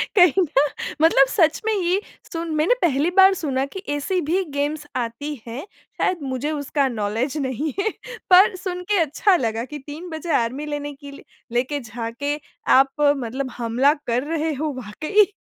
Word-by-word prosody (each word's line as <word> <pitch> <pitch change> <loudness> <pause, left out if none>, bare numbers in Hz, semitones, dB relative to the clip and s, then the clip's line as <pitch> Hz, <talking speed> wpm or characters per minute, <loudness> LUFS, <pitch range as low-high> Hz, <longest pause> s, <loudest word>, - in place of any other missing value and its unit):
कहीं 360 -1 +6
ना 285 -4 +2 0.4
मतलब 295 -4 +6
सच 320 -1 +2
में 445 - +2
ही 370 -1 +1 0.3
सुन 335 -1 -4
मैंने 310 +10 +3
पहली 300 -1 +2
बार 385 +1 +8
सुना 270 -4 0
कि 375 +8 -9
ऐसी 360 +6 -1
भी 345 +5 0
गेम्स 295 +1 -1
आती 250 +5 -3
हैं, 240 +8 -6 0.3
शायद 360 -3 0
मुझे 265 +2 -2
उसका 285 -1 0
नौलेज 230 +5 -2
नहीं 275 +1 -2
है। 390 - +2 0.4
पर 375 +2 +7
सुन 360 -1 -5
के 410 - +4
अच्छा 330 +6 +3
लगा 225 -4 -1
कि 295 +3 -8
3 320 +5 -7
बजे 320 +1 -5
आर्मी 250 +6 -1
लेने 290 -1 -4
के 280 0 -11
लि 280 - -12 0.3
लेके 260 +4 0
जाके 235 +4 -4 0.4
आप 270 0 +3
मतलब 270 -2 +1
हमला 245 +4 +3
कर 240 +2 +1
रहे 320 0 0
हो 295 +1 -2
वाक़ई 310 - +2
290 Hz, 170 wpm, -22 LUFS, 260-330 Hz, 0.4 s, बार